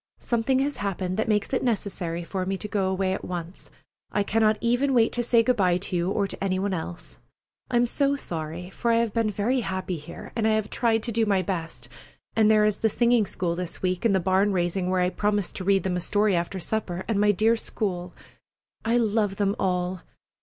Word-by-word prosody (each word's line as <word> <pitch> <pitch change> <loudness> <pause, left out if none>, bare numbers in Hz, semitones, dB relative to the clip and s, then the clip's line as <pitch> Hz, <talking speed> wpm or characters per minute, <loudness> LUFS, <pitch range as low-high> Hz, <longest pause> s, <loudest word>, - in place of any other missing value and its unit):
Something 240 +2 0
has 280 +2 0
happened 190 -2 -2
that 220 - 0
makes 210 +3 0
it 255 - +1
necessary 190 -7 -2
for 185 +2 -3
me 190 +1 -2
to 210 - -5
go 200 -3 0
away 190 0 0
at - - -4
once. 175 0 -6 0.4
I 205 - +1
cannot 215 +1 +2
even 245 +3 +1
wait 230 -2 +4
to 240 - -1
say 235 -1 +4
good 250 +1 +2
by 180 -3 +3
to 185 0 -4
you 175 +1 +1
or 200 0 0
any 190 -1 0
one 195 +1 -1
else. 175 0 -6 0.5
I 250 - -2
am 240 0 +4
so 280 +3 +1
sorry, 170 - -5
for 235 - -2
I - - +4
have 230 -2 +1
been 230 -2 +1
very 210 +6 0
happy 190 -4 -3
here, 150 - -10
and 220 -1 +1
I 220 - +3
have 215 -1 -1
tried 225 -3 +1
to 235 - -3
do 225 0 +1
my 195 -2 +2
best; 165 -9 -4 0.5
and 220 -1 +4
there 215 -1 +5
is 210 -1 +2
the 220 - +1
singing 235 -1 +3
school 175 -2 -2
this 180 +1 -5
week, 185 -1 0
and 220 -4 +3
the - - +3
barn 190 +3 +2
raising 180 +1 0
where 185 0 +2
I 180 0 +1
promised 205 -1 0
to 190 - -4
read 195 0 +3
them 185 -1 -1
a - - -2
story 205 +1 +2
after 175 +3 -2
supper, 185 -2 -2
and 210 -3 +1
my 210 0 +5
dear 220 +4 +3
school! 180 -5 -3 0.7
I 230 +2 +2
love 215 -3 +1
them 200 0 0
all! 180 -1 -1
200 Hz, 225 wpm, -25 LUFS, 185-225 Hz, 0.7 s, there